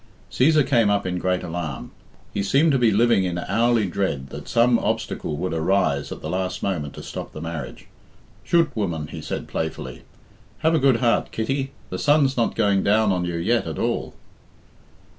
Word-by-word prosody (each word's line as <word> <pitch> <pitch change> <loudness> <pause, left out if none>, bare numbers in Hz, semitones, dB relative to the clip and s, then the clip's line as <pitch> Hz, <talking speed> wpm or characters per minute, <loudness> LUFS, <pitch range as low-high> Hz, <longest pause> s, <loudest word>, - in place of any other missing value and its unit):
Cæsar 150 +2 +4
came 115 -6 +3
up 100 -1 +1
in 90 -1 -2
great 90 0 0
alarm. 80 -5 -5 0.4
He - - -1
seemed 140 +11 +3
to 135 - +2
be 120 -2 +4
living 110 -1 +3
in 90 -1 -2
hourly 115 +4 +1
dread 85 -8 -2
that - - -9
some 120 0 +3
obstacle 75 - -2
would 90 +3 -2
arise 80 -4 +1
at - - -7
the - - -3
last 95 0 -2
moment 80 -8 -2
to - - -8
stop - - -7
the - - -7
marriage. 80 -3 -6 0.6
"Chut, 165 -4 +2
woman!" 85 -8 -2
he - - -7
said - - -5
play. 80 - -2
fully. 65 -5 -9 0.6
"Have 160 - +4
a 160 - +3
good 135 -3 +3
heart, 120 -2 +2
Kitty. 135 +4 -2 0.2
The - - -3
sun's 145 -3 +3
not 115 -2 0
going 100 -3 +2
down 105 +1 +3
on 90 -1 0
you 85 -1 -3
yet 105 +5 +1
at 80 - -5
all." - - -2
100 Hz, 190 wpm, -23 LUFS, 85-120 Hz, 0.6 s, Cæsar